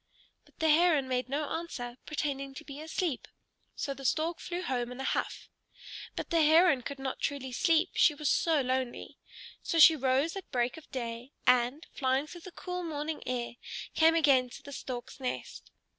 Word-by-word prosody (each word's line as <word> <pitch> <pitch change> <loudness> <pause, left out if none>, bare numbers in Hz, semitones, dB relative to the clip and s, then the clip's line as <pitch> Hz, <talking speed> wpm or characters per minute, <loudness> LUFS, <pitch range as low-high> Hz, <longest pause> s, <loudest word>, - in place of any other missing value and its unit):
But - - -26
the 320 - +2
Heron 310 -3 +4
made 255 0 -1
no 290 +2 -1
answer, 275 -8 -5
pretending 275 -3 -3
to 310 - -8
be 285 -1 -9
asleep. 320 -2 -2 0.5
So 280 - -3
the 275 0 -11
Stork 320 +5 0
flew 360 +1 -4
home 245 -6 -2
in 250 - -8
a - - -3
huff. - - -2 0.7
But - - -5
the 335 -1 +4
Heron 315 -2 +5
could 280 +3 -6
not 270 -1 -4
truly 270 -2 -2
sleep, 330 +7 +2
she 300 - +4
was 300 0 -3
so 320 -4 +3
lonely. 255 -1 -3 0.4
So 335 - -2
she 320 0 +9
rose 270 +4 +1
at 390 - -7
break 245 0 0
of 320 - -13
day, 240 0 -5
and, 250 +5 +3
flying 265 +1 +1
through 345 +3 -11
the 370 - -10
cool 360 +1 -5
morning 310 -2 -4
air, 240 -1 -3 0.4
came 325 +1 +5
again 275 -6 +4
to - - -11
the 285 - -10
Stork's 250 0 -6
nest. 255 -1 -5
285 Hz, 185 wpm, -30 LUFS, 255-320 Hz, 0.7 s, she